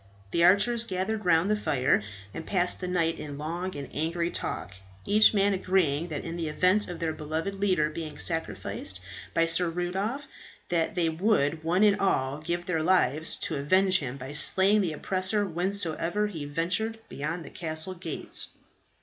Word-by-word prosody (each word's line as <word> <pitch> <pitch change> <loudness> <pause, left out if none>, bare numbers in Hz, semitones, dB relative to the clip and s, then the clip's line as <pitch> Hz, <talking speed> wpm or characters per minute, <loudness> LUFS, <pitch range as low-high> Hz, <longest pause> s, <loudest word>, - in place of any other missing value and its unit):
The 170 - +2
archers 215 +6 +4
gathered 210 +1 -3
round 175 +3 +3
the - - +3
fire 145 - +1 0.3
and 165 - -6
passed 180 -2 +1
the 180 - -3
night 165 -2 0
in 145 -2 -7
long 170 +5 -4
and 140 -2 -6
angry 170 +2 -1
talk, 95 - -4 0.3
each 215 +1 +6
man 200 -1 +2
agreeing 180 -5 +1
that 155 -4 -5
in 165 0 -5
the 165 -2 -3
event 185 +7 +2
of 175 -2 -7
their 160 -1 -1
beloved 155 +5 -3
leader 190 -6 +1
being 155 -1 -7
sacrificed 100 - -1 0.4
by 165 - +4
Sir 165 +1 +4
Rudolph, 190 - -3 0.4
they 170 +1 +1
would 160 -3 +1
one 175 +5 +2
and 205 -1 +4
all 140 -7 0
give 170 +2 -3
their 165 -3 -1
lives 160 -3 +2
to 165 -7 -1
avenge 185 +7 +3
him 135 -2 -5
by 135 +1 -8
slaying 190 +7 +4
the 170 -5 -1
oppressor 185 +6 0
whensoever 180 +1 -1
he 165 -8 -5
ventured 180 +9 -2
beyond 160 +3 -4
the - - -11
castle 160 +1 -2
gates. 170 -4 -2
170 Hz, 165 wpm, -27 LUFS, 155-190 Hz, 0.4 s, each